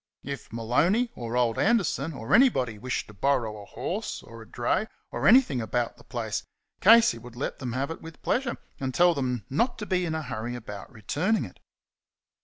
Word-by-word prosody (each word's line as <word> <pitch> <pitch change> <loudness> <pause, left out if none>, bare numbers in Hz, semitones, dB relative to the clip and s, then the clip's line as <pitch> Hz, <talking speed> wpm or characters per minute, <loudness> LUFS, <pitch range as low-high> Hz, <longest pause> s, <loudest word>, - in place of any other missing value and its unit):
If 140 -2 -6
Maloney, 160 - +2
or 120 0 -4
old 120 -2 +2
Anderson, 180 - +2
or 115 -6 -4
anybody, 130 - +4
wished 125 +3 -2
to 105 - -14
borrow 115 -2 0
a - - -11
horse, - - -4
or 115 0 -11
a 110 - -12
dray, 120 - 0 0.2
or - - 0
anything 220 - +6
about 120 +1 -1
the - - -16
place, - - -3 0.4
Casey 225 - +6
would 120 +1 -12
let 130 - -4
them 125 -3 -4
have 135 +4 -1
it 165 - -7
with 165 -1 -11
pleasure, 245 -1 0 0.2
and 130 -2 -3
tell 175 0 +6
them 125 -7 -2
not 235 - 0
to 210 - -5
be 185 -3 +1
in 160 - -2
a 160 - -2
hurry 120 -1 -4
about 105 -3 -8
returning 145 - 0
it. - - -13
130 Hz, 195 wpm, -27 LUFS, 115-180 Hz, 0.4 s, anything